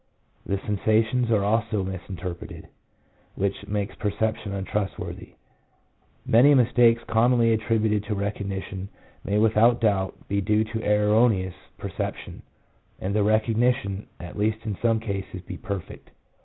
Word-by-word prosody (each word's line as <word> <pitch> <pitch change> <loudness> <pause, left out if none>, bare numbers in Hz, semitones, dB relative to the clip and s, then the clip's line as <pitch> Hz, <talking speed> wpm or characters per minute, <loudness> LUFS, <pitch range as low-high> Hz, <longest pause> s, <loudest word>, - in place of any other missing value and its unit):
The 100 - 0
sensations 110 +4 +1
are 110 -3 +3
also 110 -1 +1
misinterpreted, 90 -2 -7 0.7
which 100 0 -2
makes 105 -1 -2
perception 110 0 -2
untrust 100 0 -2
worthy. - - -7 0.9
Many 135 +6 +6
mistakes 120 -2 +4
commonly 115 0 +3
attributed 110 -2 +1
to 105 - -2
recognition 100 -1 -4 0.3
may 100 +1 0
without 110 +2 +4
doubt 100 -4 0
be 100 0 0
due 105 +3 +2
to 110 +1 -4
erroneous 105 -2 +3 0.2
perception, - - -5 0.6
and 95 +2 -2
the 105 - +2
recognition, 110 0 +1
at 90 +3 -8
least 110 +1 0
in 105 -3 -2
some 115 -1 +2
cases, 100 -4 -5
be - - -7
perfect. 100 -6 -7
105 Hz, 125 wpm, -25 LUFS, 100-115 Hz, 0.9 s, Many